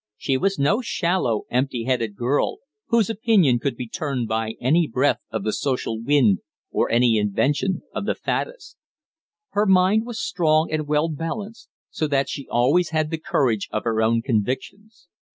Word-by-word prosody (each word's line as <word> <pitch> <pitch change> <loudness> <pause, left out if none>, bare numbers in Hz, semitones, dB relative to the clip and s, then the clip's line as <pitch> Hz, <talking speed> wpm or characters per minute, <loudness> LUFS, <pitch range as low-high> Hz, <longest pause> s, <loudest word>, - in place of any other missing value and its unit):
She 135 - -1
was 195 +9 0
no 145 - +2
shallow, 170 - 0
empty 125 -1 0
headed 115 -4 -1
girl, 130 - 0 0.3
whose 230 -3 +3
opinion 210 - +3
could 135 0 -2
be 125 0 -6
turned 140 -5 -3
by 110 0 -2
any 155 +6 +2
breath 130 +4 +1
of 110 -3 -4
the 110 - -1
social 125 -5 -2
wind 115 -7 +3 0.3
or - - 0
any 115 -2 +3
invention 140 - 0
of - - -4
the - - +1
faddists; - - -4 0.7
her 210 +1 +1
mind 190 +4 +4
was 240 -2 -5
strong 160 -3 +1
and 155 -1 -2
well 150 +2 +2
balanced, 200 - -6 0.2
so 155 - -1
that 140 -1 0
she 140 - -6
always 145 +9 +2
had 155 -1 -1
the 160 - -2
courage 120 -9 0
of 110 - -2
her 110 -1 0
own 115 +1 +2
convictions. 140 - -3
145 Hz, 170 wpm, -23 LUFS, 120-180 Hz, 0.7 s, mind